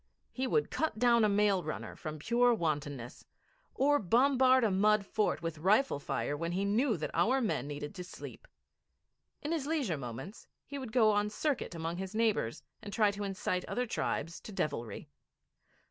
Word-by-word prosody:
He 260 0 -2
would 445 - +1
cut 315 -7 -1
down 235 -1 +4
a 215 - +4
mail 200 -2 +3
runner - - -5
from 155 -2 -6
pure 240 +9 +3
wantonness, 145 - -3 0.5
or 290 +2 +3
bombard 260 +4 +4
a 220 - +3
mud 210 +2 +3
fort 210 -5 0
with 165 -2 -4
rifle 205 - +3
fire 145 0 -2
when 170 +3 -3
he 195 +2 0
knew 220 +2 +2
that 155 - -4
our 230 +11 +3
men 210 - -1
needed 145 +3 -5
to 180 -2 -6
sleep. 185 - -10 1.0
In 300 - -2
his 310 -4 -1
leisure 270 - 0
moments 135 - -8 0.2
he 280 0 -6
would 255 -4 -6
go 220 -2 +5
on 205 0 +1
circuit 260 - -2
among 165 +1 -3
his 190 +2 -5
neighbours, 215 - 0 0.2
and 205 - -8
try 210 0 +3
to 205 +1 -5
incite 185 -2 -2
other 250 - -1
tribes 170 -7 -2
to - - -9
devilry. 120 - -3
205 Hz, 175 wpm, -32 LUFS, 165-245 Hz, 1.0 s, go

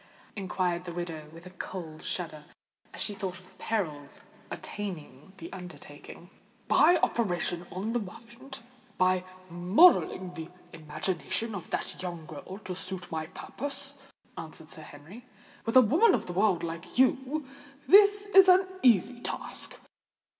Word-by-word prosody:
inquired 180 -2 -1
the 175 - -5
widow, 165 -3 -5
with 165 +2 -13
a 185 - -10
cold 170 -4 -7
shudder, 155 -4 -4 0.5
as - - -10
she 210 - -2
thought 190 -2 -4
of 185 0 -16
the - - -16
perils 155 -10 -3 0.3
attending 175 -6 -7
the 170 -2 -9
undertaking. 180 -1 -10 0.4
"By 355 - +6
operating 175 -5 0
on 200 +5 -3
the 240 - +2
mind—by 230 -3 -3 0.3
modelling 185 - +4
the 165 -1 -7 0.2
imagination 165 +7 -2
of 190 -4 -7
that - - -3
young 175 -3 -5
girl 155 +5 -8
to 185 -1 -4
suit 185 -1 -6
my 160 -1 -3
purpose," 280 - -7 0.4
answered 160 -1 -8
Sir 155 - -4
Henry. 155 +11 -12 0.4
"With 225 - -1
a - - +11
woman 335 - +5
of - - -3
the 175 - -5
world 190 -2 +2
like 170 +4 -6
you, 265 +3 +2 0.4
this 410 +1 +7
is 385 -2 +7
an 370 +1 +7 0.2
easy 240 0 +4
task. - - -4
185 Hz, 140 wpm, -29 LUFS, 170-235 Hz, 0.5 s, a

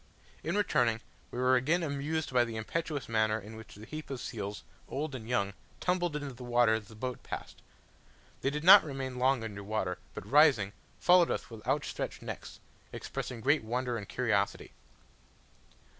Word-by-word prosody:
In 170 +4 -1
returning, 120 - +2 0.3
we - - -7
were 130 +1 +4
again 155 +8 +2
amused 150 0 -2
by 125 -1 +5
the 115 -2 -5
impetuous 145 +6 -3
manner 110 -1 +2
in 105 +2 -10
which 110 0 -11
the 105 +2 -11
heap 155 +5 -7
of 135 -2 -4
seals, 105 -4 -5 0.3
old 145 +1 -3
and 120 -3 -7
young, 100 -5 +1 0.3
tumbled 175 -3 0
into 145 -2 -4
the 125 +1 -10
water 120 -2 +4
as 110 -2 -2
the 110 - -13
boat 125 +3 -4
passed. - - -7 0.8
They 135 - +2
did 150 +2 -3
not 195 +3 +10
remain 135 -3 -4
long 130 -1 +3
under 100 -2 -6
water, 100 -3 -2 0.2
but - - -6
rising, 130 -9 +5 0.3
followed 180 -1 +6
us - - -3
with 110 -2 -9
outstretched 135 +2 -2
necks, - - -7 0.3
expressing 120 -3 -5
great 145 +2 +3
wonder 120 +2 -1
and 105 -3 -6
curiosity. - - 0
125 Hz, 175 wpm, -31 LUFS, 110-150 Hz, 0.8 s, not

